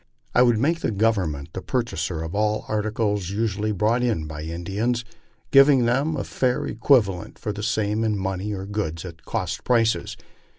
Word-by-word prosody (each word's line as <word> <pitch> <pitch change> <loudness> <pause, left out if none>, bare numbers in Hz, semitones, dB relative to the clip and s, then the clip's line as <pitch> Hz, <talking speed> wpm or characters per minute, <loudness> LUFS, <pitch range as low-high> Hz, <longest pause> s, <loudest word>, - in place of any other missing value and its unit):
I 125 - +5
would 120 -2 +5
make 140 - 0
Govern 105 -5 +2
ment 70 +1 -8
the 95 - -4
purchaser 90 -10 -2
of 80 +2 -6
all 105 +1 0
articles 105 -3 -1
usually 105 0 -1
brought 110 +4 +1
in 110 -11 0
by 75 0 -7
Indians, 100 +9 -2 0.5
giving 135 -2 +6
them 140 +6 +1
a - - -2
fair 125 -2 0
equivalent 110 - +2
for 105 - -4
the 105 - -6
same 105 +1 0
in 110 -2 +1
money, 95 +1 -2
or 95 -2 -4
goods 95 -5 -3
at 85 -2 -10
cost - - -3
prices. 115 -2 +1
105 Hz, 170 wpm, -24 LUFS, 95-120 Hz, 0.5 s, giving